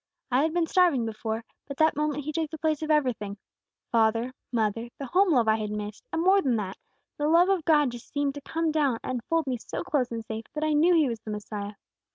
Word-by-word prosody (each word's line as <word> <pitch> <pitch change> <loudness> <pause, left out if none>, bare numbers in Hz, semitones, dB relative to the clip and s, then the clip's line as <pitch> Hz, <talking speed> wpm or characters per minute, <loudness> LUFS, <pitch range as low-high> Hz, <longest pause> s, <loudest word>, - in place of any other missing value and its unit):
I 250 +2 +4
had 315 +2 +1
been 340 0 +1
starving 325 -8 +3
before, 225 0 -3 0.2
but 280 -1 -7
that 315 0 +4
moment 295 0 -1
He 305 - -3
took 320 -1 -2
the 315 - -7
place 310 -1 0
of 310 - -3
everything, 245 -9 +1 0.5
father, 230 +2 +2 0.2
mother, 230 0 -1
the 275 - -5
home 370 +8 +3
love 245 -6 +3
I 220 0 +4
had 215 -1 -3
missed, 210 0 -5
and 325 - 0
more 390 +2 +5
than 260 -7 +1
that, 200 -3 -4 0.4
the 295 - 0
love 340 +4 +5
of 375 -5 +1
God 295 -6 +4
seemed 280 +4 -3
to 285 - -8
come 325 +2 -1
down 290 -6 +1
and 250 -2 -3
fold 330 -2 +2
me 260 -2 -1
so - - -5
close 260 -5 0
and 230 -1 -4
safe, 220 +1 -5
that 305 - -2
I 310 -1 +2
knew 335 +4 +5
He 315 -4 +4
was 230 -3 -3
the 220 - -10
Messiah. 210 -1 -5
275 Hz, 235 wpm, -27 LUFS, 225-315 Hz, 0.5 s, more